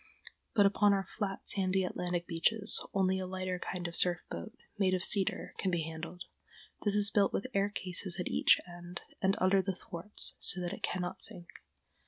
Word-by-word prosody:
But 205 -2 +5
upon 205 +1 +4
our 195 -1 -1
flat, 195 -3 -4
sandy 190 -1 +2
Atlantic 180 -1 -3
beaches 195 +5 +1
only 190 -1 +1
a 185 - -4
lighter 185 -1 -3
kind 180 -1 -4
of 170 - -8
surf 175 -1 +5
boat, 230 +5 -7 0.2
made 185 -2 +3
of 185 - -2
cedar, 195 -1 +3
can 190 - 0
be 170 -3 0
handled. 160 +3 -7 0.6
This 205 -1 +1
is 205 -1 +5
built 200 -2 +3
with - - -2
air 200 +1 +1
cases 185 -2 0
at 180 - -2
each - - +4
end 175 0 -8 0.2
and 195 +1 +2
under 190 +1 +3
the 190 -1 -3
thwarts, 195 0 -3
so - - +1
that 175 -1 -3
it - - -8
cannot 180 +1 -3
sink. 175 -1 0
185 Hz, 190 wpm, -32 LUFS, 175-195 Hz, 0.6 s, But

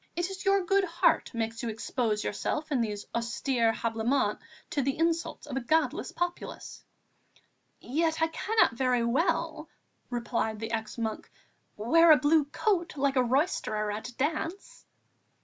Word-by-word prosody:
It 350 +2 -1
is 385 - -7
your 390 -1 +3
good 390 +2 +3
heart 345 -1 +2
makes 225 0 -3
you 235 - -2
expose 220 -1 -1
yourself 300 +8 -3
in 265 -4 +2
these 210 -3 -3
austere 235 0 +1
habiliments 225 0 0 0.3
to 285 - +1
the 270 +1 -1
insults 330 0 -1
of 285 -3 -6
a - - +1
godless 315 +7 0
populace." 350 0 -5 1.0
"Yet 320 +5 0
I 325 - +4
cannot 435 - +2
very 250 -1 +1
well," 320 +4 0 0.4
replied 235 -3 -2
the 225 +1 -5
ex 220 -1 -3
monk, 220 -2 -3 0.5
"wear 325 +10 +5
a 305 - +9
blue 300 0 +3
coat, 345 +1 -1
like 275 0 +1
a 255 - +4
roisterer 235 - 0
at 215 +4 -5
a 245 - -14
dance!" 320 +7 -3
270 Hz, 150 wpm, -29 LUFS, 230-330 Hz, 1.0 s, a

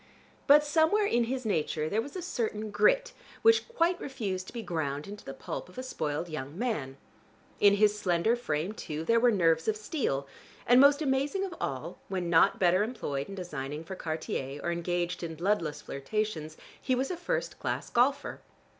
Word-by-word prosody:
But 295 +1 +8
somewhere 320 +8 +3
in 240 -10 +2
his 255 +1 -3
nature 160 -5 0
there 210 +7 +1
was 280 +7 -9
a 365 - -4
certain 220 - -3
grit 215 - +3 0.3
which 450 0 +5
quite 355 -7 +1
refused 200 -9 -4
to - - -10
be 235 -2 -5
ground 150 -5 -3
into 205 +1 -9
the - - -7
pulp - - -6
of 180 - -17
a 255 - -4
spoiled 160 - -3
young 155 -1 -6
man. 155 - -2 0.6
In 200 0 +6
his 210 0 +3
slender 185 +4 +2
frame, 170 -6 -2
too, 155 -6 -5
there 230 +4 +4
were 245 +1 +5
nerves 165 -6 +2
of 215 -1 +1
steel, 210 - -2 0.4
and, 245 +2 +7
most 285 +2 +6
amazing 280 +7 0
of 370 - -6
all, - - -4
when 180 -3 -2
not 165 -1 +5
better 180 +1 +4
employed 195 - -3
in 195 - -6
designing 150 -5 -5
for 190 +3 -7
Cartier, 155 -4 -4
or 170 - 0
engaged 175 +1 -2
in 165 -2 -5
bloodless 170 -3 -1
flirtations, 155 +1 -3 0.2
he 260 - +1
was 265 +5 -1
a - - -2
first - - -3
class - - -3
golfer. 265 +4 +1
205 Hz, 185 wpm, -29 LUFS, 160-255 Hz, 0.6 s, But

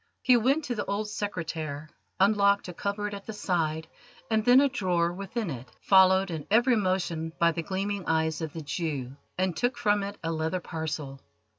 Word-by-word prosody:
He 250 - +6
went 265 +7 +2
to 250 - -2
the 210 - -2
old 200 +2 -2
oak 210 - -7
secretaire, 160 -7 -4 0.3
unlocked 200 0 +3
a 180 - -6
cupboard 205 +3 -3
at 200 -1 -8
the 220 - -5
side, 160 -5 -1 0.4
and 220 -1 +2
then 245 +3 +7
a 280 - +5
drawer 175 -8 0
within 195 +1 -4
it, 125 -1 -8
followed 190 -1 +5
in 160 -3 -5
every 240 +4 +4
motion 175 -5 -1
by 170 0 +4
the 165 - -3
gleaming 195 +2 -3
eyes 160 0 +1
of 160 -2 -3
the 160 0 -7
Jew, 145 -5 -3 0.2
and 185 -2 0
took 245 0 0
from 205 -1 +2
it 200 +1 -5
a 165 - -1
leather 160 +3 -1
parcel. 155 -5 -5
185 Hz, 190 wpm, -28 LUFS, 160-205 Hz, 0.4 s, then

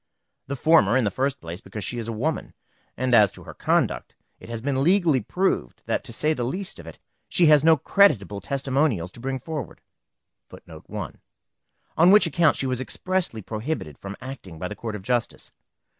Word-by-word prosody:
The 140 - -3
former, 130 -6 +4
in 130 - +2
the 105 - 0
first 135 +6 -1
place, 85 +3 -8
because 105 -3 -7
she 120 - -1
is 115 - -5
a - - -2
woman; 135 +9 -3 0.4
and 130 -1 0
as 105 -4 +6
to - - -12
her - - -10
conduct, - - 0 0.2
it - - -13
has 115 -1 -4
been 135 +2 -1
legally 170 -6 +3
proved 180 - -1
that, - - -1
to - - -7
say 155 +1 +1
the 125 - -3
least 180 - -4
of 85 - -11
it, 80 - -10 0.3
she 175 - +4
has 150 -2 +6
no 160 0 +6
creditable 110 - +3
testimonials 135 - 0
to - - -13
bring 135 +2 -3
forward, 150 -2 -6 0.7
on 170 +3 -4
which 210 +1 +7
account 165 -1 +3
she - - -1
was 130 -1 -1
expressly 180 - -2
prohibited 110 - -4
from 100 +1 -8
acting 125 -10 -9
by 90 - -4
the 105 - -7
Court 110 -1 -5
of 100 - -8
Justice. 120 +2 -2
130 Hz, 190 wpm, -24 LUFS, 105-155 Hz, 0.7 s, which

